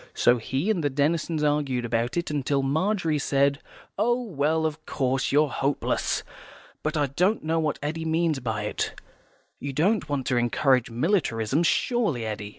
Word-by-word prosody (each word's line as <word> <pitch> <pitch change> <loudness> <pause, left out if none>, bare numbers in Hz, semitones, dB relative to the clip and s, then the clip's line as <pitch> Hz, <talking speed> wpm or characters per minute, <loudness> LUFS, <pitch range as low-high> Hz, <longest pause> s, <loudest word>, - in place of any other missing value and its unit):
So 125 - +4
he 135 - -1
and 180 -7 -1
the 145 - +2
Denisons 155 +3 0
argued 145 -5 0
about 120 +3 -1
it, 170 - 0 0.2
till 140 -1 +1
Margery 160 +2 +1
said, 140 +1 +2 0.4
"Oh, 240 +3 +2
well, 160 - 0
of 155 0 -3
course, 130 -2 0
you're 145 0 +3
hopeless. 140 +1 -1 0.6
But 155 +1 -2
I 145 - +3
don't 180 - +1
know 165 +1 0
what 155 -2 0
Eddy 160 +2 -2
means 160 -2 +1
by 110 -4 -3
it. 105 - -3 0.6
You 140 -1 -5
don't 170 +3 +1
want 140 -3 -1
to 125 - +1
encourage 125 +1 +2
militarism, 125 - +1
surely, 170 - +1
Eddy." 105 -1 -4
145 Hz, 160 wpm, -26 LUFS, 130-165 Hz, 0.6 s, So